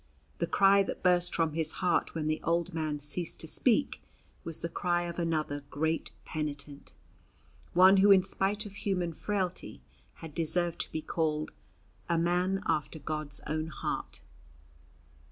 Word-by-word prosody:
The - - 0
cry 200 0 +5
that 195 - -4
burst 180 -1 +3
from 165 -2 +1
his 160 0 0
heart 180 -2 0
when 160 -2 -2
the 155 0 0
old 170 +1 0
man 155 -2 -1
ceased 150 +4 -1
to 160 - -5
speak 250 - +1 0.4
was 165 -2 -5
the 170 - -1
cry 175 +1 0
of 170 0 -5
another 155 -4 -1
great 160 +2 -1 0.2
penitent 145 -2 -5 0.8
one 185 +2 +7
who 200 +2 +6
in 190 -2 +7
spite 200 +3 -1
of 205 - -8
human 180 -4 -1
frailty 185 - -3 0.3
had 160 -2 -10
deserved 170 +1 +1
to - - -3
be 155 - -3
called 155 -2 -1 0.6
a 170 - +2
"man 180 +3 +1
after 155 +1 0
God's 150 -1 -4
own 155 +1 -2
heart." 155 - -4
165 Hz, 155 wpm, -30 LUFS, 155-180 Hz, 0.8 s, one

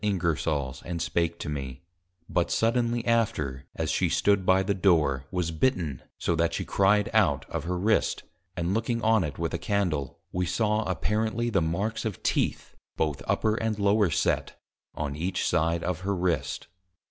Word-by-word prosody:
Ingersol's 80 -8 -1
and 85 -1 -4
spake 85 0 0
to - - -6
me; 70 -1 -5 0.4
but 85 - 0
suddenly 120 0 +1
after, 75 - 0
as - - -1
she - - +1
stood 100 -2 +2
by 95 +1 +5
the 100 +1 +1
Door, 75 -9 +2
was 90 -3 -1
bitten, 80 - 0 0.2
so 85 - 0
that 85 0 +1
she - - -3
cried 100 +1 +3
out - - +3
of - - -3
her 90 +1 -1
Wrist, 110 +5 +1 0.3
and 85 +2 0
looking 115 +2 -1
on 110 -2 +4
it 75 -3 -4
with 85 -1 -2
a 85 - -1
Candle, 85 -9 -1
we 90 0 -1
saw 105 +4 +1
apparently 110 +5 -1
the 95 -5 +2
marks 95 +8 -1
of 110 -5 -4
Teeth, - - 0 0.2
both 75 -3 -1
upper 110 - +2
and 110 -1 -1
lower 100 -1 +3
set, 70 -4 0 0.4
on 70 -2 -3
each 90 +5 -1
side 85 0 +1
of 90 -2 -2
her 100 +1 -1
Wrist. 90 -3 -1
90 Hz, 170 wpm, -27 LUFS, 80-105 Hz, 0.4 s, by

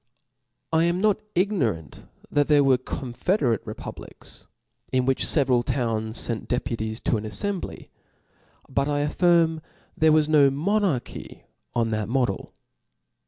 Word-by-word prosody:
I 160 +1 +4
am 170 +1 +1
not 210 0 +2
ignorant 135 - -1 0.2
that 145 -1 +2
there 145 -2 +5
were 135 -1 +4
a - - +4
confederate 130 - -1
republics; - - -10 0.4
in 130 -1 +1
which 135 0 +1
feveral 130 -5 +3
towns 115 -3 -2
fent 115 -2 -3
deputies 115 -3 -2
to 115 - +1
an 105 - -5
afiembly. 190 - -3 0.8
But 140 - 0
I 145 -1 0
affirm 165 +1 +2 0.3
there 160 0 +4
was 155 -1 +4
no 150 -3 +5
monarchf 165 - -2 0.3
on 115 -1 +1
that 110 -1 -2
model. 120 -6 -1
135 Hz, 130 wpm, -25 LUFS, 120-160 Hz, 0.8 s, there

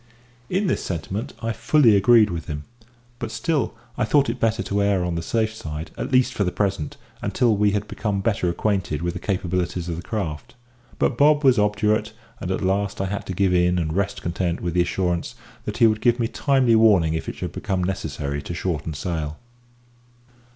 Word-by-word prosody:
In 190 +3 +1
this 185 - 0
sentiment 95 +5 -4
I 115 - 0
fully 115 0 +4
agreed 105 +1 +5
with 85 -2 -5
him; 75 -2 -4 0.6
but 120 -3 -4
still 150 -1 -1 0.2
I - - +3
thought 140 +3 +3
it 125 - -7
better 115 0 +1
to 100 0 -1
err 100 -3 +2
on 90 - -1
the 85 - -2
safe 110 +5 0
side, 80 -6 -6
at - - -4
least 130 0 +3
for 105 - 0
the 90 - 0
present, 95 -7 -2 0.2
until 120 -4 +2
we 105 0 +3
had 105 +1 -1
become 100 -3 -2
better 95 -3 0
acquainted 90 -4 -1
with 85 0 -1
the - - -5
capabilities 90 -2 -2
of 85 - -3
the - - -5
craft. 85 -7 -4 0.4
But 120 - 0
Bob 150 +1 +5
was 130 -4 +5
obdurate, 105 +1 +1 0.3
and 90 - -5
at 95 - -1
last 95 +1 0
I 95 - 0
had 100 +1 -4
to 95 - -3
give 95 0 +2
in 90 0 +3
and 80 -2 -1
rest 100 +2 -1
content 85 0 -1
with 85 -2 -3
the 90 - +3
assurance 90 -1 -1 0.3
that - - -4
he - - +5
would 110 -1 +3
give 120 0 +3
me 115 - +1
timely 130 -3 +2
warning 100 -8 +5
if 80 - -3
it - - -6
should - - -5
become 95 -2 -2
necessary 75 -6 -3
to 85 - -6
shorten 80 -4 -3
sail. 80 -1 -3
100 Hz, 205 wpm, -23 LUFS, 85-110 Hz, 0.6 s, agreed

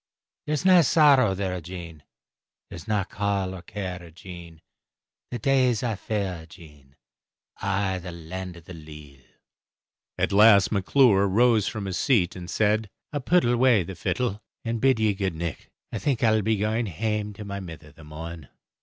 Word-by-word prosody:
There's 150 +4 -1
nae 185 -2 +7
sorrow 135 - +4
there, 95 -2 -3
Jean, 85 -2 -9 0.7
There's 85 - -9
nae 105 -2 +1
caul 100 -1 -2
or 95 - -8
care, 90 -2 -6
Jean, 85 -1 -11 0.7
The 120 - -4
days 130 -4 +2
aye 115 -3 -1
fair, 95 -5 -4
Jean, 75 -5 -17 0.6
I' 95 -1 -1
the 90 0 -8
Land 85 +2 -7
of 85 - -15
the 90 - -10
Leal. 75 -4 -12 1.0
At - - 0
last 100 -2 +6
McClure 100 0 +4
rose 110 +1 +3
from 110 -3 -4
his 95 -1 -3
seat, 100 -10 +2
and 90 -1 -8
said, 110 0 +1 0.2
"I'll 145 - -1
pit 170 +6 +2
awa 120 -3 +3
the 95 - -7
fiddle, 105 +4 -2 0.2
and 115 -1 -2
bid 130 -3 +3
ye 110 -1 +3
a - - +1
good 95 -3 -2
nicht. 85 -1 -5 0.2
I - - -3
think 135 -5 -1
I'll 110 -1 +4
be 110 +1 +1
going 110 +3 -1
hame 105 +3 -2
to 105 +1 -9
my 100 0 -5
mither 80 -5 -10
the 80 - -16
morn." 80 0 -9
100 Hz, 170 wpm, -25 LUFS, 85-110 Hz, 1.0 s, nae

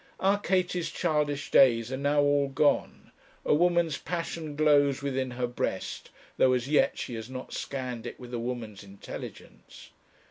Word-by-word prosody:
Our 195 +1 +2
Katie's 180 -2 0
childish 150 -4 -1
days 120 -3 +5
are - - -1
now 145 +1 +2
all 145 -1 +3
gone. 140 +2 0 0.3
A - - +3
woman's 170 -1 +2
passion 165 -2 -4
glows 145 -2 +3
within 135 -2 -1
her 125 0 -2
breast, 120 0 -4 0.3
though 130 - +4
as 125 0 -1
yet 150 +1 +2
she - - -5
has 110 +1 -6
not 130 -1 -7
scanned 125 -4 -4
it - - -8
with 125 -1 -10
a 120 - -2
woman's 115 -4 -5
intelligence. 100 0 -11
140 Hz, 155 wpm, -28 LUFS, 125-155 Hz, 0.3 s, days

